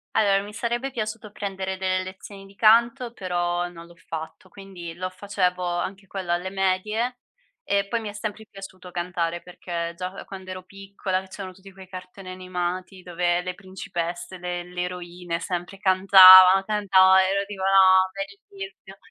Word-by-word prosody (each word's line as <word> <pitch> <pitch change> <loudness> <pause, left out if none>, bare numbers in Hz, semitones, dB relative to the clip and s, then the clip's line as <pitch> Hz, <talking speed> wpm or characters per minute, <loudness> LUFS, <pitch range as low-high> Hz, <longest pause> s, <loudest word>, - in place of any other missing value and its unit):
Allora 195 -2 +3
mi 205 +1 -10
sarebbe 240 +4 -2
piaciuto 215 -3 -5
prendere 190 -2 -4
delle 185 0 0
lezioni 195 +1 -10
di 195 0 -17
canto, 230 +3 +4
però 175 -3 -2
non 170 -1 -12
l'ho 170 - -17
fatto, 165 +2 -8
quindi 185 -3 -9
lo 185 +2 -4
facevo 185 -1 -1
anche 185 +3 -3
quello 185 -2 -5
alle 175 +2 -1
medie 210 +6 -1 0.5
e 200 - 0
poi 230 +3 -1
mi 215 - -5
è - - -8
sempre 215 +1 -6
piaciuto 190 -2 -11
cantare 175 -1 -2
perché 170 -1 -5
già, 180 +1 -5
ehm, - - -9
quand'ero 185 -1 -8
piccola, 195 -1 -4
c'erano 190 -1 -8
tutti 195 +1 -15
quei 190 0 -14
cartoni 185 +1 -10
animati 185 0 -5
dove 175 0 0
le 180 0 -5
principesse, 180 -2 -6
le 175 0 -4
le 180 0 -5
eroine 175 -1 -5
sempre 175 +2 -5
cantavan, 190 -1 +9
cantava, 190 -2 +5
ero 200 +1 0
tipo: 200 -1 -8
"No, 190 -1 +5
bellissimo!" 290 - -9
185 Hz, 155 wpm, -24 LUFS, 180-200 Hz, 0.5 s, cantavan